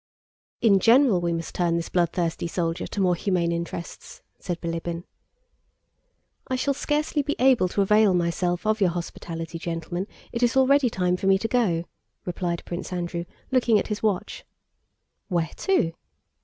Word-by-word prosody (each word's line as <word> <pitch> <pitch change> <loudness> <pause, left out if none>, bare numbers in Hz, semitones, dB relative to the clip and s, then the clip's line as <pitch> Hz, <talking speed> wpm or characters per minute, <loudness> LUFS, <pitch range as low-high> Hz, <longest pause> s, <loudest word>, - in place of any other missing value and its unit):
"In 200 -4 +5
general 230 -3 +5
we 170 0 0
must 165 -1 -4
turn 175 -2 +1
this 170 0 -2
bloodthirsty 170 -1 0
soldier 165 0 -2
to - - -5
more 180 -2 +3
humane 175 -1 0
interests," 170 0 -6 0.2
said 175 -2 -4
Bilíbin. 170 0 -4 1.4
"I 260 - -1
shall 280 +2 +1
scarcely 295 +2 0
be 290 +1 -2
able 255 -6 +4
to 200 +2 +1
avail 210 -1 +4
myself 175 +1 0
of 215 0 +1
your 190 - +5
hospitality, 165 -1 -5
gentlemen, 170 +3 -4 0.2
it 235 - -3
is 245 +2 +2
already 265 0 +5
time 180 -3 0
for 195 - -2
me 195 0 +5
to 225 - -2
go," 210 -9 +1 0.4
replied 175 -1 -2
Prince 175 +2 -5
Andrew 175 -1 -3 0.3
looking 245 -4 +4
at - - -2
his 210 -1 -3
watch. 205 -4 -1 0.8
"Where 170 -5 -1
to?" 370 - +1
180 Hz, 155 wpm, -25 LUFS, 170-225 Hz, 1.4 s, In